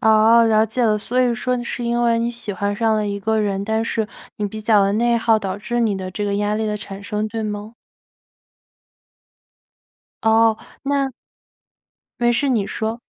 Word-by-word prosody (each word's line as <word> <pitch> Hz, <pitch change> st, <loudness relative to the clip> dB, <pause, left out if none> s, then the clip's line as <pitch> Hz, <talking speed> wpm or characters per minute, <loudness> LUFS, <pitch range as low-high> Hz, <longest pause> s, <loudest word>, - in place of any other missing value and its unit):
哦， 220 Hz, +1 st, +5 dB
了 220 Hz, -1 st, +4 dB
解 235 Hz, +3 st, -2 dB
了。 215 Hz, -2 st, +2 dB
所 245 Hz, +4 st, -1 dB
以 245 Hz, -2 st, +2 dB
说 250 Hz, +1 st, -1 dB
你 240 Hz, -, -4 dB
是 240 Hz, -, -4 dB
因 235 Hz, 0 st, 0 dB
为 230 Hz, -1 st, +3 dB
你 235 Hz, +1 st, 0 dB
喜 235 Hz, -3 st, -6 dB
欢 200 Hz, +2 st, -2 dB
上 225 Hz, +1 st, +1 dB
了 210 Hz, -1 st, 0 dB
一 200 Hz, 0 st, -3 dB
个 220 Hz, +2 st, 0 dB
人， 200 Hz, -2 st, -1 dB
但 220 Hz, +1 st, 0 dB
是 220 Hz, -2 st, -1 dB, 0.3 s
你 210 Hz, -, -2 dB
比 215 Hz, +2 st, -7 dB
较 210 Hz, -2 st, +4 dB
地 200 Hz, -, 0 dB
内 235 Hz, +3 st, +2 dB
耗， 225 Hz, -1 st, +3 dB
导 195 Hz, -2 st, -4 dB
致 240 Hz, +3 st, -2 dB
你 215 Hz, -4 st, +1 dB
的 185 Hz, -1 st, -5 dB
这 205 Hz, +3 st, -3 dB
个 200 Hz, 0 st, -1 dB
压 205 Hz, +1 st, 0 dB
力 220 Hz, +1 st, -1 dB
的 210 Hz, 0 st, -1 dB
产 200 Hz, -1 st, -9 dB
生， 210 Hz, +1 st, -2 dB
对 225 Hz, +1 st, -4 dB
吗？ 210 Hz, +1 st, -5 dB, 2.5 s
哦， 225 Hz, 0 st, +4 dB, 0.3 s
那 275 Hz, -1 st, 0 dB, 1.1 s
没 240 Hz, 0 st, +4 dB
事 245 Hz, +4 st, +1 dB
你 220 Hz, -6 st, +1 dB
说。 225 Hz, +3 st, -3 dB
220 Hz, 210 characters per minute, -20 LUFS, 205-235 Hz, 2.5 s, 哦